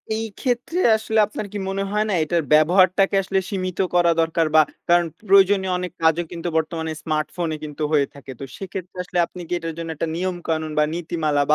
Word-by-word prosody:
এই 225 +1 -2
ক্ষেত্রে 255 +7 -1 0.2
আসলে 220 0 0
আপনার 215 0 -5
কি - - -3
মনে 195 +1 -2
হয় 210 +1 +1
না - - 0
এটার 165 +1 0
ব্যবহারটাকে 185 +5 +4
আসলে 190 0 0
সীমিত 185 -3 -3 0.2
করা 175 -1 +5
দরকার। 165 0 +1
বা 155 - +9 0.3
কারণ 175 0 +5 0.2
প্রয়োজনীয় 195 -1 +5
অনেক 180 0 -4
কাজও 160 +2 +3
কিন্তু 170 0 -5
বর্তমানে 160 0 -2
স্মার্টফোনে 155 +1 -2
কিন্তু 150 0 -5
হয়ে 145 -3 +3
থাকে। 140 -1 -10
তো - - -6
সেক্ষেত্রে 185 -1 -7
আসলে 180 0 -2
আপনি 180 - -10
কি 180 - -4
এটার 165 -1 -5
জন্য 165 -1 -5
একটা 165 - -2
নিয়মকানুন 170 -3 -2
বা 150 - +5
নীতিমালা। 160 -3 -1
175 Hz, 185 wpm, -22 LUFS, 160-190 Hz, 0.3 s, বা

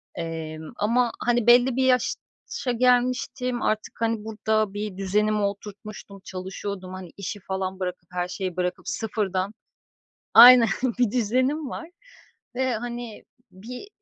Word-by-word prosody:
emm, 160 0 -6
ama, 235 +3 +1
hani, 240 -1 +1
belli 245 +1 +6
bir 260 0 +2
yaşa 255 +1 -1
gelmiştim, 250 0 +1
artık, 215 0 -1
hani, 225 -2 0
burada 215 -1 0
bir 205 -2 -5
düzenimi 210 +2 +1
oturtmuştum, 200 0 -6
çalışıyordum, 190 0 -6
hani, 185 -3 -8
işi 200 +1 -5
falan 190 0 -4
bırakıp, 180 -1 -5
her 180 0 -2
şeyi 185 -2 -5
bırakıp 180 0 -2
sıfırdan 200 -2 -2 0.8
Aynen. 240 0 +10 0.3
Bir 240 -4 +3
düzenim 255 +6 0
var 325 +6 -7 0.7
ve, 260 -1 0
hani, 240 -1 -6 0.3
bir 245 - -9
215 Hz, 125 wpm, -25 LUFS, 190-245 Hz, 0.8 s, Aynen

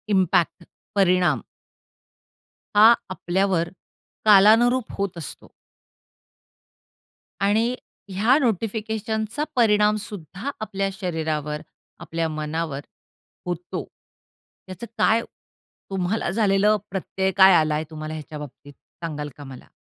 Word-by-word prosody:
Impact, 180 -1 +2 0.3
परिणाम 180 - +3 1.4
हा 210 - +8 0.3
आपल्यावर 185 -2 0 0.6
कालानुरूप 220 +4 +6
होत 195 -3 -2
असतो. 160 -6 -9 1.9
आणि 205 +3 +3 0.4
ह्या 220 +8 +3
नोटिफिकेशनचा 220 - -2
परिणाम 210 -3 +4
सुद्धा 195 - -7
आपल्या 195 -2 -2
शरीरावर, 155 -5 -3 0.4
आपल्या 165 -1 -2
मनावर 155 -1 -3 0.6
होतो. 175 0 -4 0.8
त्याचं 185 +5 -7
काय 225 +1 +3 0.7
तुम्हाला 190 +2 -1
झालेलं 205 +1 +3
प्रत्यय 190 0 -2
काय 190 0 +8
आला 155 -2 +3
आहे 155 - -1
तुम्हाला 155 -1 -6
ह्याच्या 155 -1 -7
बाबतीत, 145 0 -11 0.3
सांगाल 150 -3 -4
का 145 - -9
मला? 135 -2 -11
190 Hz, 95 wpm, -23 LUFS, 160-210 Hz, 1.9 s, हा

